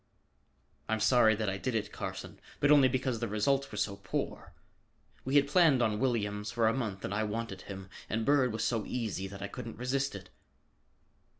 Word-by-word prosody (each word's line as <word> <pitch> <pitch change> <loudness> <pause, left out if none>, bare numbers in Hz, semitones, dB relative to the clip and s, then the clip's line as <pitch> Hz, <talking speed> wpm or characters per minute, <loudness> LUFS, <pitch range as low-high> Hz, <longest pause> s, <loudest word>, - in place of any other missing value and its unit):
"I'm 110 0 +1
sorry 110 -1 +5
that 110 0 -2
I 95 0 -2
did 130 +1 -2
it, 105 -2 -1
Carson, - - -6 0.2
but 145 - +4
only 140 -3 +7
because 130 -2 -1
the 115 - -2
results 135 +7 0
were 105 - -7
so 100 -1 -1
poor. - - -4 0.7
We 135 +2 -2
had 145 -1 +5
planned 145 -5 +4
on 105 -2 0
Williams 105 -5 -1
for 115 +1 +1
a 110 - +3
month 105 -7 -3
and 100 - -3
I 105 - 0
wanted 115 +2 -4
him. 95 -1 -7 0.2
And 110 0 -1
Bird 135 -3 +3
was 110 +1 -2
so 115 -1 0
easy 110 -6 -3
that 100 0 -8
I - - -2
couldn't 110 +3 -8
resist 135 +1 -1
it." 95 -1 -10
115 Hz, 195 wpm, -31 LUFS, 105-130 Hz, 0.7 s, only